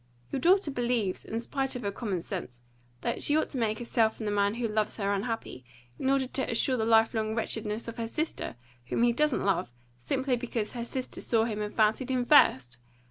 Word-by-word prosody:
Your 275 - -1
daughter 355 +2 +4
believes, 240 -7 -1
in 225 - -3
spite 270 +3 -2
of 245 - -5
her 200 - -1
common 195 -5 -3
sense, 150 -12 -6 0.4
that - - -2
she 295 - +4
ought 315 - 0
to 265 - -3
make 220 -2 0
herself 230 -2 +1
and 220 - -5
the 210 - 0
man 205 +1 +2
who 235 -1 -1
loves 215 0 -1
her 200 -2 0
unhappy, 205 - -3 0.4
in 265 - 0
order 270 -1 +3
to 265 +1 -2
assure 255 +2 +1
the 220 -3 0
life 225 0 +4
long 220 -1 -1
wretchedness 220 -1 -2
of 230 - -6
her 230 -1 -2
sister, 305 - -3 0.3
whom 230 - 0
he 240 0 +4
doesn't 300 -4 +1
love, 195 -11 +1 0.3
simply 260 - 0
because 235 -3 -3
her 235 -1 -4
sister 255 +1 -3
saw 225 -2 +2
him 215 -2 -2
and 210 0 -4
fancied 220 +4 +2
him 255 -2 +1
first! 130 - +5
230 Hz, 215 wpm, -29 LUFS, 210-255 Hz, 0.4 s, first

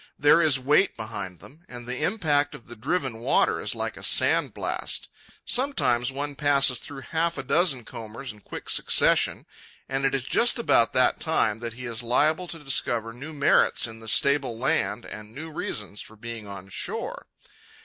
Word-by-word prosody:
There 150 +3 +5
is 155 -4 +4
weight 145 +9 +2
behind 110 -5 -6
them, 155 +5 -16
and 120 -1 -8
the 125 +3 -4
impact 155 -7 +2
of 115 - -13
the 120 - -10
driven 130 0 -2
water 120 +4 +2
is - - -3
like - - -4
a - - -10
sandblast. - - 0 0.4
Sometimes 135 - +1
one 145 +2 -4
passes 140 -4 +3
through 135 -2 -8
half 165 +1 0
a - - -3
dozen 150 -8 +1
combers 115 +3 -7
in 105 - -18
quick - - -9
succession, - - +3 0.4
and 135 +1 -2
it 135 0 +2
is 135 - -2
just 235 - +2
about 120 - +3
that - - +3
time 110 0 +1
that 115 -1 -5
he 125 +2 -8
is 115 -1 -3
liable 150 +9 +2
to 170 - -6
discover 120 -6 -1
new 140 +6 -8
merits 145 -2 +3
in 115 -1 -8
the 110 - -11
stable 135 0 +3
land 115 -3 0
and 105 +1 -10
new 160 +2 -7
reasons 105 -8 -5
for 110 - -12
being 115 -1 -8
on 100 -1 -9
shore. - - -5
130 Hz, 180 wpm, -26 LUFS, 115-145 Hz, 0.4 s, There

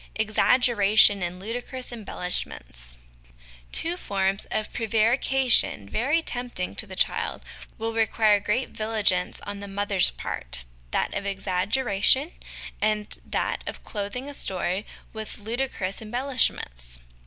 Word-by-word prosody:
Exaggeration 215 -2 +4
and 180 +1 -3
Ludicrous 245 +5 -5
Embellishments. 65 - -5 0.7
Two 335 +2 +2
forms 195 - -1
of 215 - -2
prevarication, 230 - +3
very 280 - +1
tempting 245 -10 -2
to 220 - -3
the 190 - -8
child, - - -1 0.3
will 225 0 -3
require 220 -2 +3
great 220 +6 -1
vigilance 215 -4 0
on 205 0 -6
the 200 - -7
mother's 200 -1 +3
part - - -5 0.3
that - - -1
of 200 0 -3
exaggeration 200 - +2 0.5
and 215 -1 +1
that - - -2
of - - -6
clothing 215 +6 -5
a 285 - -7
story 185 -4 0 0.3
with 220 -1 -6
ludicrous 220 -3 -3
embellishments. 215 - -1
210 Hz, 115 wpm, -26 LUFS, 190-240 Hz, 0.7 s, Exaggeration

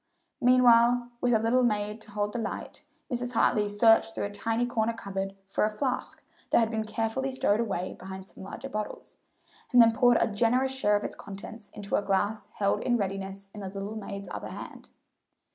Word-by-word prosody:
Meanwhile, 245 -1 +5
with 245 - +2
a 225 - +5
little 230 +3 +2
maid 210 -2 0
to 215 - -12
hold 205 0 -2
the 240 - -2
light, 215 -3 -5 0.3
Mrs. 245 0 -2
Hartley 210 -2 +3
searched 225 +2 +4
through - - -2
a 200 - -3
tiny 225 +3 0
corner 230 -1 0
cupboard 195 -3 -4
for 195 - -1
a 215 - +3
flask 250 +4 -3 0.3
that - - +4
had 225 -1 +3
been 220 -1 -1
carefully 225 +5 -2
stowed 225 -5 +1
away 195 -6 -2
behind 190 0 -8
some - - -15
larger 195 +7 -7
bottles, 215 -5 -6 0.5
and 245 - +6
then 230 -1 +8
poured 245 0 +5
a - - +4
generous 240 +5 +1
share 210 -6 +2
of 205 - 0
its - - -5
contents 205 +2 -9
into 200 -1 -2
a - - +1
glass 205 +2 0
held 200 -1 +1
in 240 -1 +2
readiness 195 -1 -4
in 210 - -8
the 195 - -5
little 200 +2 -5
maid's 200 -2 -6
other - - -5
hand. - - -9
215 Hz, 195 wpm, -28 LUFS, 200-240 Hz, 0.5 s, then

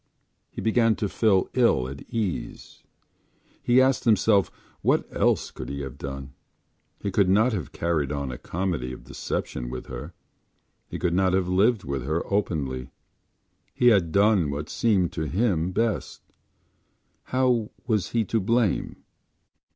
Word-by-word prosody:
He - - -7
began 115 0 +3
to 105 - -2
feel 100 -2 +2
ill 115 - +3
at 70 +1 -8
ease. 105 -6 -4 0.8
He 120 +1 +4
asked 130 0 +3
himself 105 -3 +3 0.3
what - - +2
else - - +1
could 65 - -7
he 70 0 -4
have 65 -3 -7
done. 70 0 -6 0.7
He 100 - -3
could 95 -1 +3
not 110 +6 +4
have 95 - -4
carried 80 -5 -1
on 70 -3 -3
a 60 - -7
comedy 85 -9 -3
of - - -10
deception - - -4
with 65 0 -6
her; - - -8 0.7
he - - -5
could 90 -2 0
not 95 0 +2
have 95 -1 +1
lived 100 +4 +2
with 70 -2 -3
her 80 +5 -1
openly. 70 -11 -1 0.9
He 125 - +5
had 95 -8 +3
done 100 -5 +3
what 75 +2 -4
seemed 100 -7 +2
to 80 -1 -3
him 90 -2 0
best. 115 +3 -2 1.0
How 125 -4 +1 0.2
was 105 -6 0
he 115 -2 0
to 115 - 0
blame? 110 0 0
95 Hz, 150 wpm, -25 LUFS, 70-110 Hz, 1.0 s, He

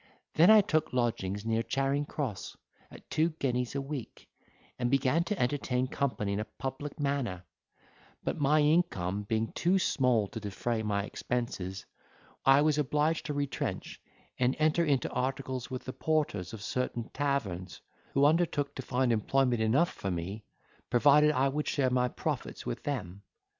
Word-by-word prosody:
Then 170 +5 +6
I 215 -1 +9
took 160 -8 0
lodgings 105 -5 -1
near 115 0 +1
Charing 135 +4 0
Cross, 120 - -4 0.3
at - - -14
two 160 +2 +2
guineas 125 -2 -1
a 140 - 0
week, 135 -4 -7 0.5
and 120 -1 +1
began 135 +5 +2
to 210 -1 -2
entertain 125 -1 0
company 110 -7 -1
in 100 - -1
a - - -1
public 135 +5 -6
manner; 140 -11 -1 0.8
but - - -2
my 150 +2 +4
income 145 - +1
being 110 +2 -1
too 180 +3 +2
small 125 - +2
to - - -6
defray 110 +2 -2
my 100 -2 0
expenses, 95 -5 -4 0.6
I 135 +2 +6
was 150 -1 +2
obliged 150 +3 +1
to 150 - -3
retrench, 145 -1 -3 0.4
and 125 +1 +2
enter 155 +2 +3
into 140 -6 +1
articles 130 -1 -2
with 130 -1 -5
the 130 - -5
porters 150 - -1
of 110 -2 -8
certain 120 -1 -2
taverns, 100 - -2 0.4
who 140 +1 +5
undertook 150 -2 +2
to - - -3
find 125 -1 +1
employment 125 +2 +1
enough 135 +11 +2
for 95 - -4
me, 95 +5 -4 0.4
provided 145 +4 +5
I 135 -2 +2
would 150 +2 -2
share 130 -3 +1
my 125 0 +2
profits - - -4
with - - -4
them. 100 -9 -4
130 Hz, 160 wpm, -30 LUFS, 110-145 Hz, 0.8 s, I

